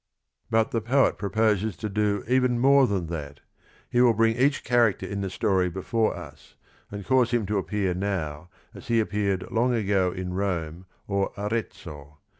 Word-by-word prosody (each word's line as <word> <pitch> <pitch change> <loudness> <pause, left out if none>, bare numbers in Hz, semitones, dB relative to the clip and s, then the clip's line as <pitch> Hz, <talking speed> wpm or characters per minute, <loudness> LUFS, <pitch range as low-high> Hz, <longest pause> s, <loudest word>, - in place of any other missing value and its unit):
But 115 0 +2
the 115 - -1
poet 130 +5 +2
proposes 105 0 0
to 110 - -4
do 105 -1 0
even 125 -1 +2
more 135 +2 +5
than 95 -5 -1
that. 75 -4 -6 0.5
He 120 - +1
will 120 -2 +5
bring 115 0 +2
each 135 +3 +1
character 120 -4 +2
in 100 0 -4
the 95 - -2
story 95 -1 +1
before 110 +5 -1
us, - - -12 0.3
and 100 -1 -7
cause 125 +1 +3
him 120 -3 0
to 105 +1 0
appear 95 -2 -1
now 90 -4 -3 0.2
as - - -12
he 115 -1 +2
appeared 100 -3 -1
long 120 +2 +1
ago 100 -4 +1
in 90 0 -5
Rome 90 -3 -3 0.2
or 100 -1 -1
Arezzo. 85 -9 -5
100 Hz, 170 wpm, -25 LUFS, 95-115 Hz, 0.5 s, more